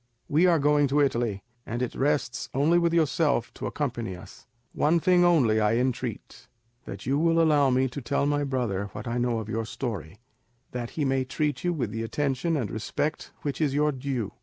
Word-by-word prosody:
We 165 +4 +4
are 170 -2 +4
going 145 0 +3
to 140 +2 +1
Italy, 120 -8 0 0.2
and 120 +3 -3
it 125 - -3
rests 140 -3 -1
only 155 +6 +4
with 170 -1 +2
yourself 150 -6 +1
to - - -5
accompany 120 -9 -3
us. 90 - -14 0.3
One 160 +3 +2
thing 180 +1 +4
only 135 -11 +4
I 105 +1 +2
entreat, 125 0 -3 0.4
that - - -8
you 140 +3 +1
will 165 +1 +3
allow 150 -4 +4
me 130 +1 +2
to 140 +3 -6
tell 140 +3 0
my 145 0 +1
brother 120 -8 -1
what - - -7
I 120 +1 -1
know 120 -1 0
of 110 -2 -4
your 115 +1 -2
story, 105 - -5 0.5
that 120 -1 -4
he 150 - +1
may 135 -1 +1
treat 145 +1 -2
you 175 - +1
with 125 -11 -2
the 115 - -4
attention 140 +6 -1
and 120 -7 -2
respect 145 +8 -3
which 145 +2 -3
is 140 -3 +1
your 150 +1 +3
due. 130 -6 -3
135 Hz, 200 wpm, -27 LUFS, 120-150 Hz, 0.5 s, We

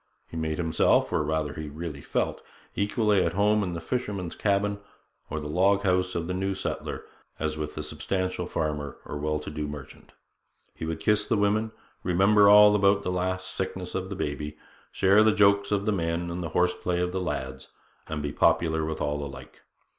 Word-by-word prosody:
He - - -11
made 80 -1 -2
himself, 80 -2 +2
or - - +2
rather 75 -1 -1
he 80 -1 -6
really 75 -1 -6
felt, - - -2 0.3
equally 105 -1 +2
at 85 -1 0
home 105 +2 +3
in 90 -3 -2
the 85 - -4
fisherman's 100 -3 -3
cabin 100 0 0 0.5
or 80 - -3
the 75 - -7
log 95 +6 +2
house 90 -1 +1
of 85 - -1
the 90 - -3
new 95 +1 -1
settler - - -4 0.3
as 80 -1 -2
with 75 -1 -5
the 75 - -4
substantial 90 +5 -2
farmer 75 -3 -3
or 75 - -5
well 75 +1 0
to 75 - -7
do 75 -1 -3
merchant; 75 -2 -10 0.6
he - - -6
would 80 -1 -3
kiss 105 +5 +2
the 110 - +2
women, 105 +2 +1 0.3
remember 100 +3 +5
all 105 0 +8
about 100 0 +3
the 90 - -1
last 90 0 -2
sickness 95 -1 -4
of 95 0 -3
the 100 - -4
baby, 75 -2 -4 0.3
share 100 +2 +4
the 110 0 +5
jokes 100 -1 +3
of 100 -1 +1
the 110 - +2
men 85 -1 -1
and 90 +1 -4
the 85 - -4
horse 90 +3 +2
play 90 0 -2
of 90 0 0
the 95 0 -2
lads, 65 -5 -4 0.4
and 75 -1 -4
be 75 - -2
popular 80 +1 +2
with 80 0 -3
all 75 0 -1
alike. 70 -2 -10
90 Hz, 200 wpm, -27 LUFS, 75-100 Hz, 0.6 s, all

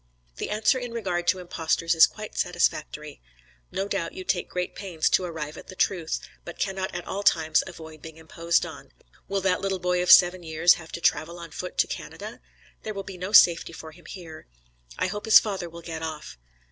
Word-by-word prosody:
Thy - - -3
answer 215 +4 +2
in 245 -2 -6
regard 180 -6 -2
to - - +3
impostors 165 -1 -1
is 165 - +8
quite 215 0 -9
satisfactory. 155 -4 -1 0.5
No 195 +1 -2
doubt 195 -5 -2
you 185 - -7
take 180 -1 -1
great 180 0 -3
pains 175 -6 -2
to - - +3
arrive 160 -3 -5
at - - -11
the 185 - -10
truth, 175 -4 0 0.2
but 175 - -9
cannot 190 -2 -3
at 175 - -5
all 200 - -4
times 160 -5 +3
avoid 160 -2 -11
being 160 -1 -11
imposed 165 +1 0
on. - - -11 0.3
Will 195 +1 -1
that 185 -1 +1
little 195 -1 -1
boy 180 0 0
of 180 - -1
seven 180 0 +7
years 160 +1 +4
have 160 - -13
to 170 - -5
travel 170 +1 +1
on 170 -2 -9
foot 180 +4 -7
to - - +4
Canada? - - -8 0.4
There 215 -1 -6
will 195 - -4
be 190 -2 -9
no 185 +2 -4
safety 170 -5 +6
for 160 -1 -9
him 175 +2 -18
here. 165 -4 -10 0.5
I - - 0
hope 205 +4 -4
his 220 - +9
father 195 -5 -4
will 170 0 -11
get 160 -1 -6
off. 160 -2 -6
175 Hz, 210 wpm, -26 LUFS, 160-190 Hz, 0.5 s, his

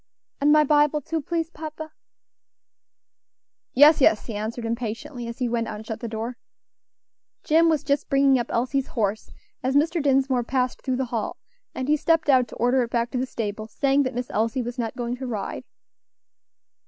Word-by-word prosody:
"And 290 +1 +4
my 305 0 +6
Bible 300 0 +3
too, 320 +3 -3
please, 330 +2 -2
papa." 315 -1 -7 1.8
"Yes, 295 +3 +7
yes," 220 -5 +4
he 230 - -6
answered 220 +3 -4
impatiently, 235 +2 -4
as 235 - -6
he 250 - -1
went 230 -1 -1
out - - -5
and 215 +1 -9
shut 220 -1 -5
the 235 - -5
door. 230 +2 -5 1.1
Jim 330 +2 +4
was 310 -3 +1
just 280 0 0
bringing 275 -1 +4
up 240 - -2
Elsie's 260 +3 0
horse, 210 -1 -1 0.3
as 265 +1 -1
Mr. 325 +3 +2
Dinsmore 265 -3 +2
passed 255 +1 -1
through 260 - -1
the 265 - -1
hall, 225 -2 -2 0.4
and 260 - -3
he 300 +1 +3
stepped 325 0 +1
out 255 -3 +5
to - - -11
order 245 +2 +2
it 235 - -2
back 235 0 -1
to 255 - -1
the 260 - -1
stable, 215 -2 -4
saying 275 +5 +1
that 255 -3 -2
Miss 245 0 -4
Elsie 230 +4 0
was 240 +2 -6
not 225 -2 -2
going 240 0 -3
to 260 0 -5
ride. 215 -5 -4
255 Hz, 190 wpm, -24 LUFS, 235-290 Hz, 1.8 s, Yes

